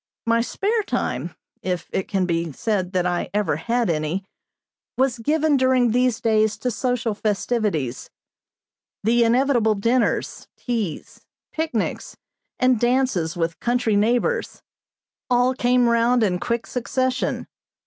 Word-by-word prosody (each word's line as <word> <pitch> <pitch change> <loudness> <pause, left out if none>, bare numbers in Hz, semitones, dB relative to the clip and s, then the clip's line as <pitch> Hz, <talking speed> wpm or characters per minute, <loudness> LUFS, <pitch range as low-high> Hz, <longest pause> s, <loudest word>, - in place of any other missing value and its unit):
My 230 0 +3
spare 420 - 0
time, 410 - -3 0.3
if 180 -2 -3
it 190 - -1
can 190 -2 0
be 170 -2 -1
said 190 - -1
that 180 -1 +1
I 175 -1 -1
ever 205 -8 +1
had 235 +7 0
any, 165 +4 -1 0.7
was 255 -2 +1
given 300 +4 +2
during 260 -2 +3
these 250 0 +2
days 220 -1 +2
to 250 - -2
social 240 -2 -1
festivities. 205 - -1 0.9
The 235 +3 +3
inevitable 235 -2 +3
dinners, 230 +5 0
teas, 220 - -4 0.3
picnics, 315 -9 -3 0.4
and 255 -3 +3
dances 240 -9 +1
with 165 -1 -2
country 240 -3 +1
neighbors, 240 - 0 0.7
all 250 +1 +3
came 250 -1 +2
round 235 +1 +3
in 180 -4 +1
quick 235 +4 -2
succession. 255 +1 -1
230 Hz, 125 wpm, -22 LUFS, 195-250 Hz, 0.9 s, My